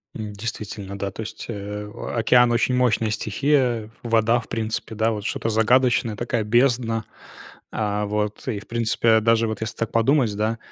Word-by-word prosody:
М, 105 -2 -5
действительно, 100 -2 -6
да. 100 0 -3
То 105 - -7
есть, 110 - -7
э, 105 -1 -5 0.3
океан- 120 +1 +4
очень 125 +2 +2
мощная 115 -3 +2
стихия. 120 0 +1
Вода, 115 0 +3
в 120 - -10
принципе, 110 0 -3
да, 110 +1 +2
вот 105 -2 -4
что-то 115 - -2
загадочное, 115 0 +3
такая 120 0 -1
бездна. 120 0 +2 0.7
А, 105 -1 -1
вот, 105 +2 -3
и, 110 -5 -1
в - - -15
принципе, 115 -1 +2
даже 115 +1 +3
вот 110 -2 -4
если 110 +1 -4
так 115 - -3
подумать, 115 0 +3
да, 110 +2 0
115 Hz, 170 wpm, -23 LUFS, 105-120 Hz, 0.7 s, океан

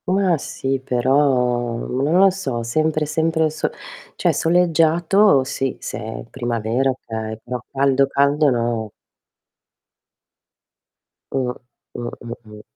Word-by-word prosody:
Ma 185 -2 +2
sì 135 -1 -3
però, 125 -2 +1
non 140 +8 0
lo 195 0 +6
so, 135 -12 -3
sempre 155 +5 0
sempre 160 0 +1
sol 155 - -2 0.4
cioè - - +1
soleggiato 170 0 +3
sì, 135 0 -3
se 105 - -5
è 110 0 -6
primavera, 120 +1 -1
okay, 110 -4 -5
però 125 0 -5
caldo, 135 0 +2
caldo 140 +2 +3
no. 115 -3 -1 2.4
Mh. 130 -2 0 0.4
Mh, 120 0 -4
mh, 120 -1 -6
mh. 105 0 -12
135 Hz, 115 wpm, -21 LUFS, 120-155 Hz, 2.4 s, lo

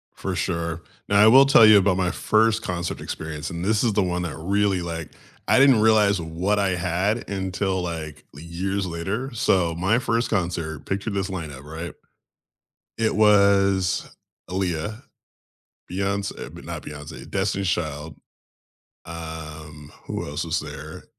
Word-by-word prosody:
For 95 -1 -4
sure. 85 -1 -2 0.3
Now, 100 - +4
I 105 - +8
will 135 +5 +8
tell 135 -5 +7
you 110 -1 +8
about 95 -2 +3
my 90 -1 +1
first 110 0 +2
concert 85 -3 -4
experience, 75 -2 -5
and 85 +1 -5
this 105 +1 +2
is 115 -3 +2
the 105 -1 +2
one 90 -1 -1
that 80 -3 -5
really, 100 +2 +1
like 85 -2 -5 0.4
I - - +5
didn't 135 -5 +6
realize 105 -3 +4
what 90 +6 -1
I 100 -1 +2
had 90 +5 -1
until, 95 -1 -1
like, 80 -4 -6
le 75 - -11
years 95 +4 -3
later. 100 +10 -4
So, 90 -8 +1
my 95 +8 +2
first 115 -1 0
concert, 85 -7 -2
picture 100 +2 -2
this 100 -1 -2
lineup, 80 -7 -6
right? 80 +3 -7 1.0
It 115 -1 +1
was 100 -3 +3 0.4
Aaliyah, 95 +4 -2 0.9
Beyoncé 100 +2 -3
but - - -11
not - - -6
Beyoncé, 75 +2 -9
Destiny's 95 -1 -1
Child. 75 -3 -3 0.9
Um, 80 -2 -8
who - - -4
else 75 +4 -3
was 80 - -1
there? - - -9
95 Hz, 150 wpm, -24 LUFS, 85-100 Hz, 1.0 s, I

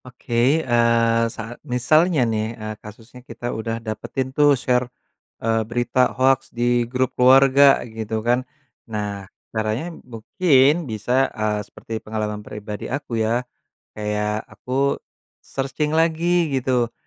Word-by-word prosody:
Oke, 125 -1 -10 0.3
eee, 115 -1 +3
saat 115 +1 -8
misalnya 150 +4 +2
nih, 110 0 -2
eee, 110 -1 -5
kasusnya 115 +4 -13
kita 120 0 -6
udah 115 +1 -3
dapetin 115 +4 -4
tuh 145 -1 +4
share, 125 0 0 0.6
eee, 115 0 +2
berita 120 +1 +1
hoaks 130 0 +2
di 120 0 0
grup 130 0 -1
keluarga, 135 +2 +6
gitu 110 -1 -5
kan. 120 +1 +3 0.5
Nah, 100 -3 -4 0.2
caranya 110 +10 -2
mungkin 140 - +2
bisa, 125 +5 +1
eee, 105 -2 -2
seperti 110 0 -8
pengalaman 105 -1 -4
pribadi 105 0 -7
aku 130 -5 -3
ya, 115 +3 0 0.5
kayak 105 0 -2
aku 135 +2 -1 0.4
searching 140 +3 -2
lagi 165 0 +2
gitu, 125 -2 0
120 Hz, 125 wpm, -22 LUFS, 110-130 Hz, 0.6 s, keluarga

